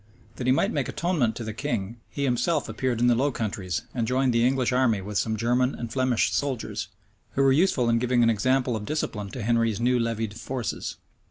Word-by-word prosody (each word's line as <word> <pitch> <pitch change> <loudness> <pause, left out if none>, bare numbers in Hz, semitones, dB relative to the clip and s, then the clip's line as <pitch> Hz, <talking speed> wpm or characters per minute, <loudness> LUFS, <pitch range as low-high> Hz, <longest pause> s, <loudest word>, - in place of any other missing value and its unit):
That 125 - -3
he - - +5
might 130 - +2
make 145 -4 -1
atonement 160 -10 0
to 120 - -5
the 110 -1 -4
king, 115 -4 -3
he 140 - -4
himself 140 +4 +1
appeared 125 -3 -1
in 120 - +3
the 120 - +5
Low 135 +5 +2
Countries, 100 -6 -3
and 115 -3 -1
joined 130 0 +2
the 115 0 +3
English 130 0 +2
army 125 -5 +2
with 100 +2 -2
some 110 -1 -1
German 125 +4 +1
and 115 -2 -6
Flemish 130 -3 +1
soldiers, 135 -5 -2 0.5
who 135 - +2
were 135 - +5
useful 140 -4 +3
in 115 0 +3
giving 125 0 +2
an 115 - +5
example 125 +3 +1
of 105 -1 -4
discipline 105 -9 -2
to 120 +2 -6
Henry's 115 -1 +1
new 125 +1 +2
levied 115 -2 -1
forces. 120 +2 -4
120 Hz, 210 wpm, -26 LUFS, 115-130 Hz, 0.5 s, he